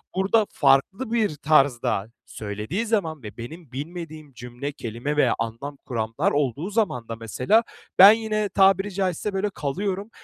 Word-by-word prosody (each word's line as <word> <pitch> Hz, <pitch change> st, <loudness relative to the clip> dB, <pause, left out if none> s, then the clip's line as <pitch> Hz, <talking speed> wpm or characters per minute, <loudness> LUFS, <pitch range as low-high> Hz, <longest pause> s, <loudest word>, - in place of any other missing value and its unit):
burada 200 Hz, +3 st, +2 dB
farklı 160 Hz, -, +2 dB
bir 220 Hz, -9 st, +1 dB
tarzda 135 Hz, -9 st, +2 dB, 0.2 s
söylediği 105 Hz, -, -4 dB
zaman 165 Hz, -, -1 dB
ve 105 Hz, -1 st, -9 dB
benim 140 Hz, +5 st, -9 dB
bilmediğim 155 Hz, +1 st, -7 dB
cümle, 125 Hz, +4 st, -6 dB
kelime 125 Hz, +2 st, -4 dB
veya 130 Hz, -5 st, +3 dB
anlam 115 Hz, +6 st, -5 dB
kuramlar 115 Hz, -2 st, -1 dB
olduğu 145 Hz, -, -1 dB
zaman 180 Hz, -, -1 dB
da, 115 Hz, -, -5 dB
mesela, 125 Hz, -, +1 dB, 0.4 s
ben 195 Hz, +2 st, +11 dB
yine 215 Hz, -2 st, -1 dB
tabiri 195 Hz, +1 st, +3 dB
caizse 190 Hz, +1 st, -2 dB
böyle 195 Hz, +2 st, 0 dB
kalıyorum. 195 Hz, +6 st, -3 dB
150 Hz, 140 wpm, -24 LUFS, 125-195 Hz, 0.4 s, ben